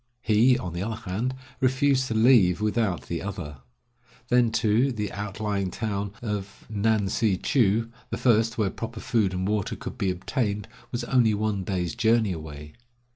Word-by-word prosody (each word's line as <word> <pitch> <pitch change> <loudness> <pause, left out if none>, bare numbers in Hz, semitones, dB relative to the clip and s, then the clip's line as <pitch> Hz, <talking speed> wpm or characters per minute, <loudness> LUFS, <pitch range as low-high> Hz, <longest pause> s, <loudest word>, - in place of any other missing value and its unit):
He, 115 +4 +4
on 90 -2 -5
the 85 - -3
other 110 +3 -2 0.2
hand, 120 +7 -1 0.2
refused 130 0 +2
to 115 - -2
leave 110 -6 +5
without 105 -3 0
the 85 -1 -4
other. 90 -8 -6 0.7
Then 125 -1 +4
too, 115 +4 +2
the 105 -4 -3
outlying 105 -1 -2
town 100 0 -3
of 100 -3 -5
Ngan 105 -1 +1
si 105 -2 +1
chou, 115 0 +2 0.2
the - - -3
first 115 -2 +2
where 105 -4 +1
proper 115 0 -6
food 110 -6 +1
and 95 0 -2
water 105 -2 -1
could - - -8
be 95 - +1
obtained, 105 +3 -2 0.2
was 120 0 -2
only 120 -4 +3
one 105 -2 -1
day's 90 -2 -2
journey 115 -2 +2
away. 75 -3 -7
105 Hz, 165 wpm, -26 LUFS, 95-115 Hz, 0.7 s, leave